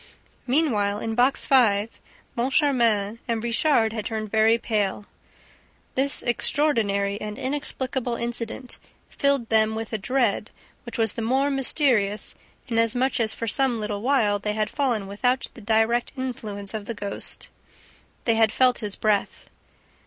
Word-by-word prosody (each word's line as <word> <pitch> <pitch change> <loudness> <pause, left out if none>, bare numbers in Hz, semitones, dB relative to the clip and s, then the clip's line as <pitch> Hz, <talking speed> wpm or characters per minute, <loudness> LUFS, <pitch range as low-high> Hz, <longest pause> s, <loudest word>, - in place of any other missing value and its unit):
Meanwhile, 235 -8 +2
in 225 +1 -3
Box 250 +4 +2
Five, 225 -5 +3 0.4
Moncharmin 235 -5 +1
and 230 -2 -1
Richard 235 -1 +2
had 220 -2 -3
turned 215 -2 -4
very 220 +1 +4
pale. 210 -3 -1 0.9
This 275 +2 +1
extraordinary 215 -6 +1
and 210 0 -5
inexplicable 260 -2 -3
incident 235 +1 -4 0.3
filled 280 -4 0
them 220 0 +3
with 225 0 -5
a 220 - -1
dread 235 -1 0 0.4
which 235 - -6
was 225 -2 +1
the - - -5
more 265 +5 +1
mysterious 245 -7 +1 0.3
inasmuch 240 +3 +1
as 220 -1 +1
for 230 - -4
some 250 0 +2
little 210 -1 -3
while, 225 -5 +2
they 210 +1 -2
had 215 0 -1
fallen 245 -8 0
within 245 +6 +1 0.2
the 235 - -12
direct 225 +3 +1
influence 215 -6 -4
of 215 -2 -5
the 230 - -5
ghost. 200 -1 -6 0.8
They 230 - +3
had 225 -1 +3
felt 255 0 +3
his 210 -3 -3
breath. 210 -2 -1
230 Hz, 140 wpm, -24 LUFS, 210-255 Hz, 0.9 s, very